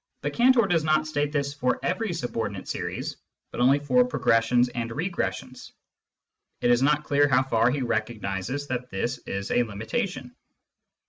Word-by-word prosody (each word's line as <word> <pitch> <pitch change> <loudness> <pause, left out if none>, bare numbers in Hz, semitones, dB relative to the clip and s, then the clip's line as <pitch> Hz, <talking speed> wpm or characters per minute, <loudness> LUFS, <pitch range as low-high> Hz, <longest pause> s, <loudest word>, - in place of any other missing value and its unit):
But - - -2
Cantor 245 -1 +5
does 175 -5 +1
not 155 0 +2
state 145 -1 -1
this 140 -2 -1
for 125 -3 0
every 195 +3 -1
subordinate 115 - -4
series, - - -4 0.3
but - - -7
only 135 +3 +5
for 145 +13 +3
progres 115 - +2
sions 120 +1 +3
and 120 -1 -4
regressions. 165 +9 -4 0.9
(It 120 - +2
is 120 +1 +4
not 150 +2 +3
clear 145 0 +3
how 130 -1 +3
far 120 -2 +2
he 135 +1 -1
recognises 110 +3 -2
that 125 0 -3
this 120 +6 -2
is 100 0 -4
a - - +3
limitation.) 125 - -4
135 Hz, 160 wpm, -26 LUFS, 120-155 Hz, 0.9 s, Cantor